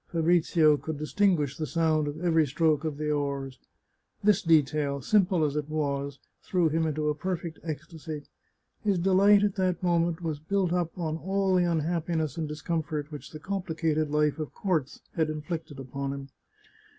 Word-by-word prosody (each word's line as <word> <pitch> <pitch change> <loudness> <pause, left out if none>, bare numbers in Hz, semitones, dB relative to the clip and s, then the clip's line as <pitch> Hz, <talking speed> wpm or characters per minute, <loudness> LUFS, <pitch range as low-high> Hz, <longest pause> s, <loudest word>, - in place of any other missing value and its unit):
Fabrizio 165 -2 +3
could 155 +1 -5
distinguish 155 -3 +1
the 155 - -3
sound 160 -2 +1
of 145 +2 -4
every 160 -3 +4
stroke 155 +2 +2
of 155 -3 -3
the 150 0 -1
oars. 140 -3 -2 0.6
This 210 -2 +4
detail, 150 -3 +2
simple 185 - +3
as 145 -1 -2
it 150 0 -2
was, 140 -2 -2 0.2
threw 175 -4 +1
him 160 +1 +1
into 150 0 -1
a - - +2
perfect 170 0 -4
ecstasy; 155 -1 -6 0.6
his 200 -3 +2
delight 195 +3 +5
at 205 -2 +2
that 185 -2 0
moment 170 -1 +1
was 155 -3 -2
built 180 +2 0
up 175 -1 -1
on 160 -3 -2
all 195 +2 0
the 180 -1 +4
unhappiness 160 -2 -1
and 160 -2 -2
discomfort 155 0 -3
which 150 - -8
the 155 - -8
complicated 160 -4 -1
life 150 +1 +1
of 155 - -5
courts 160 -8 -1
had 160 -2 +1
inflicted 155 -1 -5
upon 135 +1 -4
him. 140 0 -7
160 Hz, 165 wpm, -28 LUFS, 150-175 Hz, 0.6 s, delight